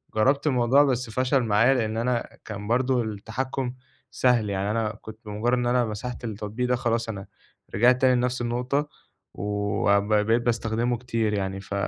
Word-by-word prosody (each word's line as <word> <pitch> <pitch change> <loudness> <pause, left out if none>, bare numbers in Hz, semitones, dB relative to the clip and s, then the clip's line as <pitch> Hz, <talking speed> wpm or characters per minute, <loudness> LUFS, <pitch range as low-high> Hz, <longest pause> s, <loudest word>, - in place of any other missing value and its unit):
جرّبت 135 +7 +2
الموضوع 130 +1 +4
بس 125 -4 0
فَشَل 130 +3 +1
معايا 115 +4 +4
لإن 110 -4 -1
أنا 120 +1 -1 0.2
كان 105 -1 -6
برضه 125 +1 +2
التحكّم 125 +5 -4 0.4
سهل 120 -4 +2
يعني 100 +1 -1
أنا 110 -1 0
كنت 110 0 -10
بمُجرّد 110 +4 0
إن 120 - -1
أنا 120 0 +2
مسحت 115 +3 -6
التطبيق 110 +3 -3
ده 125 - +3
خلاص 115 -2 -1
أنا 100 -3 -5 0.5
رجعت 125 +5 +4
تاني 130 -1 +5
لنَفْس 125 0 0
النقطة 125 +5 -1 0.5
و 100 0 +1
ب 100 - -7
بقيت 110 +3 +3
باستخدمه 115 +1 0
كتير 115 -3 -1
يعني، 95 -1 -2
ف 100 - -8
115 Hz, 165 wpm, -25 LUFS, 105-125 Hz, 0.5 s, تاني